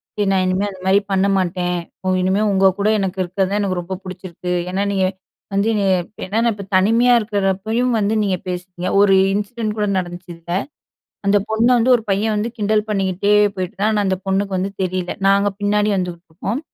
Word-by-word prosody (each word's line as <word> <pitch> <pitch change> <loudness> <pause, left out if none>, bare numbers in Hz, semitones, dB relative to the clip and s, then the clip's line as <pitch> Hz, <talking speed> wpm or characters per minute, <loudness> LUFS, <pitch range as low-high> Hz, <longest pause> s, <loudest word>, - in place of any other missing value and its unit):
"சரி 210 - 0
நான் 190 -1 +2
இனிமே 185 +2 0
அந்தமாரி 190 +1 +1
பண்ண 195 +1 +2
மாட்டேன். 180 -1 -1 0.3
ஒ 185 - -4
இனிமே 190 +3 +1
உங்க 190 -1 +4
கூட 200 - +1
எனக்கு 190 -1 -2
இருக்கிறதே 190 +3 -1
எனக்கு 190 -3 -1
ரொம்ப 185 +2 -5
பிடிச்சிருக்கு. 185 -1 -7 0.2
ஏன்னா, 195 +2 -1
நீங்க 190 -1 +1 0.5
வந்து 200 +2 +1
என்னைய 200 -2 +1 0.3
ஏனா 200 +4 -3
நான் 235 - +2
இப்ப 200 -1 -8
தனிமையா 230 +6 +4
இருக்கிறப்பயும் 215 +3 0
வந்து 205 +1 +1
நீங்க 190 -2 0
பேசுவீங்க" 180 0 -4
ஒரு 200 -1 +5 0.2
இன்சிடென்ட் 210 +1 -2
கூட 210 - +1
நடந்துச்சு 175 0 -7
இதில. 170 +1 -10 0.8
அந்த 205 +1 +5
பொண்ண 220 +2 +2
வந்து 245 +2 +4
ஒரு 225 - -3
பையன் 210 +2 +1
வந்து 215 +3 -1
கிண்டல் 215 +1 +1
பண்ணிக்கிட்டே 195 0 +1 0.2
போயிட்டு 185 0 -4
இருந்தான். 210 +2 0
ஆனா 210 -1 +1
அந்த 190 - 0
பொண்ணுக்கு 195 +1 0
வந்து 190 +2 -1
தெரியல. 185 -1 -2 0.2
நாங்க 200 +1 +4
பின்னாடி 210 +1 +1
வந்துகிட்டுருக்கோம். 180 - -4
195 Hz, 180 wpm, -19 LUFS, 185-210 Hz, 0.8 s, ஒரு